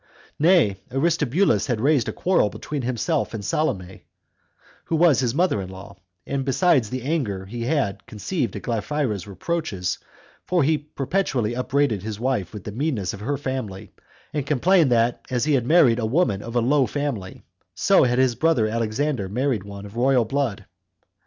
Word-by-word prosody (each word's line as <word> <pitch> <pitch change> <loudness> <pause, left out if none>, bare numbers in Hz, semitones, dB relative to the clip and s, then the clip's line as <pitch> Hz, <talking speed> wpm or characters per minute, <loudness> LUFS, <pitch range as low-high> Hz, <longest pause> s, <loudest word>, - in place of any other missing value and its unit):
3. 155 - +3
Nay, 160 - +4
Aristobulus 150 - +2
had 120 -4 -1
raised 135 -1 +2
a - - -1
quarrel 185 - +2
between 145 +6 -5
himself 130 +3 -1
and 100 -2 -6
Salome, 95 -12 -2 0.8
who 165 - -1
was 160 -3 +4
his 125 -1 0
mother 170 - +2
in 95 - -7
law, 95 +1 -10 0.3
besides 135 - +2
the 130 0 -4
anger 125 - -2
he 115 +4 -5
had 100 -9 -1
conceived 115 - -3
at - - -6
Glaphyra's 115 -3 -2
reproaches; 100 - -3 0.4
for 180 -4 +1
he 155 +2 +2
perpetually 140 - -1
upbraided 125 -4 0
his 105 +1 -5
wife 120 -8 -1
with 105 -3 -8
the 105 - -6
meanness 120 - -2
of 100 - -8
her 140 +7 -2
family, 125 -8 -5 0.4
and 145 -2 -2
complained, 155 +1 +3
that 120 0 +2
as 125 0 0
he 155 - +2
had 125 -3 +1
married 135 -8 +5
a 115 - -1
woman 115 - +1
of 115 +2 -8
a 120 - +3
low 135 +2 +3
family, 130 -8 -4 0.3
so - - +4
had 125 -1 +2
his 130 -2 +3
brother 125 -1 +2
Alexander 115 0 -1
married 125 -1 0
one 100 0 -9
of 100 +2 -11
royal 125 0 +3
blood. 130 -3 -2
125 Hz, 170 wpm, -23 LUFS, 105-145 Hz, 0.8 s, married